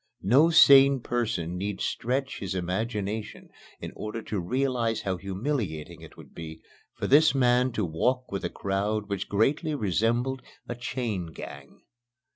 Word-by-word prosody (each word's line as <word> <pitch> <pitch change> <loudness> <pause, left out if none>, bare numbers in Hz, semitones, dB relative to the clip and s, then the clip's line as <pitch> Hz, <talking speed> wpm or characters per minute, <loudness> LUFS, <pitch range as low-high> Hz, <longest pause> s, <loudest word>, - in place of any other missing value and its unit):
No 135 - +5
sane 140 -4 +7
person 95 -9 -2
need 100 0 -3
stretch 130 +3 -2
his 95 -1 -4
imagination 105 +3 -3 0.3
in - - -7
order 110 +1 -5
to 105 - -3
realize 120 +3 -1
how 95 -2 -2
humiliating 95 - -4
it - - -13
would - - -14
be 80 -1 -8 0.4
for - - -4
this 150 +1 +5
man 125 -1 +3
to 105 - -1
walk 125 +11 -1
with 100 - -4
a - - -1
crowd 100 +2 -2
which 100 -1 -3
greatly 145 - +1
resembled 120 - 0 0.3
a - - -3
"chain 120 -6 -3
gang." - - -11
110 Hz, 145 wpm, -27 LUFS, 95-130 Hz, 0.4 s, sane